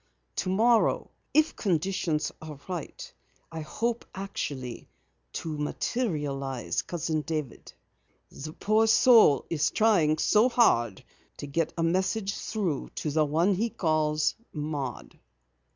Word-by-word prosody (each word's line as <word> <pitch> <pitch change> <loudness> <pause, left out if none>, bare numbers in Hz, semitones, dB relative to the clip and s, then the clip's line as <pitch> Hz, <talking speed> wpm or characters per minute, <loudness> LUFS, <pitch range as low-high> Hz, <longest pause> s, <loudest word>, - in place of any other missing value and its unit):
Tomorrow 220 +5 +2 0.2
if 310 +1 +3
conditions 175 -4 0
are 155 -3 -9
right, 180 -5 -6 0.4
I 165 - -5
hope 230 +9 -2
actually 140 - -5 0.4
to 160 -2 -4
materialize 145 - -2
Cousin 160 -2 -2
David. 150 -5 -5 0.6
The 155 +3 -8
poor 215 +4 +2
soul 220 - +6
is 155 -2 +2
trying 175 -9 +3
so 215 +9 +4
hard 120 - +2 0.3
to - - -6
get 150 +3 -1
a 165 - 0
message 190 +4 0
through 190 -12 -3
to 150 - -2
the 155 +1 +2
one 165 +7 +2
he 220 +5 0
calls 155 -5 +1 0.2
Maud." 140 - -5
160 Hz, 115 wpm, -28 LUFS, 150-205 Hz, 0.6 s, soul